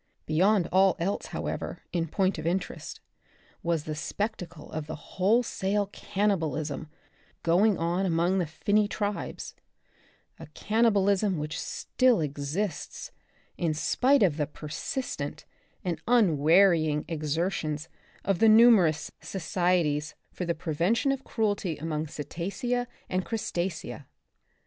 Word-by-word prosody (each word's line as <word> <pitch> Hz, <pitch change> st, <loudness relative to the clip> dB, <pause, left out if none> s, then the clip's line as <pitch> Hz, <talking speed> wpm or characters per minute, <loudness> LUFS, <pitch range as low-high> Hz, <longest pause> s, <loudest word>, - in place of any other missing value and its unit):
Beyond 180 Hz, +4 st, +3 dB
all 190 Hz, 0 st, +5 dB
else, 190 Hz, +4 st, -2 dB
however, -, -, -4 dB
in 170 Hz, -2 st, 0 dB
point 190 Hz, +1 st, 0 dB
of 155 Hz, -, -3 dB
interest, 180 Hz, +2 st, -3 dB, 0.6 s
was 170 Hz, -4 st, 0 dB
the 155 Hz, -, -4 dB
spectacle 170 Hz, -1 st, -4 dB
of 155 Hz, -1 st, -4 dB
the 155 Hz, -, -5 dB
wholesale 200 Hz, +2 st, 0 dB
cannibalism 160 Hz, -7 st, -1 dB, 0.5 s
going 190 Hz, +5 st, +4 dB
on 175 Hz, +3 st, 0 dB
among 175 Hz, +3 st, +2 dB
the 175 Hz, -, 0 dB
finny 205 Hz, +7 st, +1 dB
tribes, 205 Hz, 0 st, -4 dB, 0.9 s
a -, -, -9 dB
cannibalism 205 Hz, -3 st, +2 dB
which 150 Hz, +1 st, -3 dB
still 255 Hz, -5 st, +1 dB
exists, 150 Hz, +5 st, -3 dB, 0.5 s
in 160 Hz, -3 st, 0 dB
spite 260 Hz, -, +3 dB
of 165 Hz, -6 st, +2 dB
the 150 Hz, -2 st, 0 dB
persistent 155 Hz, -, -5 dB, 0.4 s
and 170 Hz, -4 st, -2 dB
unwearying 165 Hz, -, +4 dB
exertions 155 Hz, 0 st, -2 dB, 0.4 s
of 195 Hz, -3 st, +1 dB
the 225 Hz, -, +6 dB
numerous 215 Hz, -9 st, +6 dB
Societies 165 Hz, -3 st, 0 dB, 0.2 s
for 180 Hz, -, -4 dB
the 170 Hz, -1 st, -1 dB
Prevention 175 Hz, -, +1 dB
of 270 Hz, -1 st, -3 dB
Cruelty 205 Hz, -7 st, -1 dB
among 155 Hz, 0 st, -3 dB
Cetacea 200 Hz, -, -3 dB, 0.2 s
and 185 Hz, 0 st, -1 dB
Crustacea. 175 Hz, -, -3 dB
175 Hz, 115 wpm, -28 LUFS, 155-205 Hz, 0.9 s, the